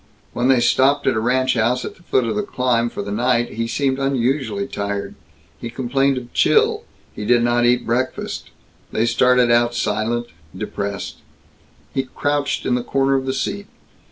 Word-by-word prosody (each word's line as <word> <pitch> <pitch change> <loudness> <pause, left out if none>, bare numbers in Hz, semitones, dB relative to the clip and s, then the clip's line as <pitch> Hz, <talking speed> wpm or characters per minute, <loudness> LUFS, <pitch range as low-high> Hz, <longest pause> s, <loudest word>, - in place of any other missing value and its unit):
When 120 +1 0
they 130 -2 +5
stopped 135 +4 +3
at - - +3
a 110 - 0
ranch 130 +3 +1
house 120 +2 +1
at - - -7
the - - -22
foot 130 -6 +1
of 115 - -2
the - - +1
climb, 125 - 0
for 100 - -5
the 100 - -6
night, 120 +2 +1
he 115 +1 -3
seemed 135 +3 0
unusually 130 -5 0
tired. 100 0 -4 0.5
He 120 - -5
complained 135 +2 0
of 120 -1 -8
chill. - - +3 0.3
He 105 - -5
did 120 +2 +3
not 120 0 +2
eat 125 0 +2
breakfast. 125 +3 -2 0.4
They 110 - +1
started 125 +1 +3
out 120 0 +3
silent, 115 +2 -1 0.3
depressed. 100 -1 -4 0.8
He 135 - +1
crouched 145 +2 -2
in - - +1
the 125 - +1
corner 135 +2 +1
of 135 -1 0
the - - +1
seat. 200 +9 -3
120 Hz, 180 wpm, -20 LUFS, 115-130 Hz, 0.8 s, they